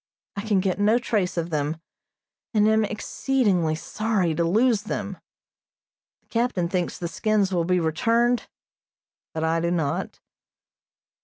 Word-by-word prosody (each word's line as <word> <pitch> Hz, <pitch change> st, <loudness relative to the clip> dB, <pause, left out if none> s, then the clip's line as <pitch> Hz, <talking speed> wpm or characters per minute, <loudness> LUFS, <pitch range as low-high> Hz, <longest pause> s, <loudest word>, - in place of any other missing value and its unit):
I 200 Hz, -, -3 dB
can 205 Hz, -3 st, +1 dB
get 190 Hz, 0 st, -1 dB
no 210 Hz, +3 st, +4 dB
trace 210 Hz, -7 st, -1 dB
of 170 Hz, 0 st, -2 dB
them, 150 Hz, +1 st, -1 dB, 0.8 s
and 210 Hz, 0 st, +4 dB
am 220 Hz, 0 st, +4 dB
exceedingly 210 Hz, -, 0 dB
sorry 195 Hz, 0 st, -1 dB
to 170 Hz, -, 0 dB
lose 220 Hz, +5 st, +3 dB
them. 210 Hz, -, -5 dB, 1.0 s
The -, -, -41 dB
captain 230 Hz, -7 st, 0 dB
thinks 180 Hz, 0 st, -2 dB
the 175 Hz, -, -3 dB
skins 205 Hz, +1 st, 0 dB
will 170 Hz, -2 st, +1 dB
be 180 Hz, +1 st, +2 dB
returned, 230 Hz, +9 st, +1 dB, 0.8 s
but 160 Hz, -, -3 dB
I 165 Hz, +1 st, +1 dB
do 170 Hz, +1 st, 0 dB
not. 160 Hz, -5 st, -2 dB
190 Hz, 140 wpm, -24 LUFS, 170-220 Hz, 1.0 s, no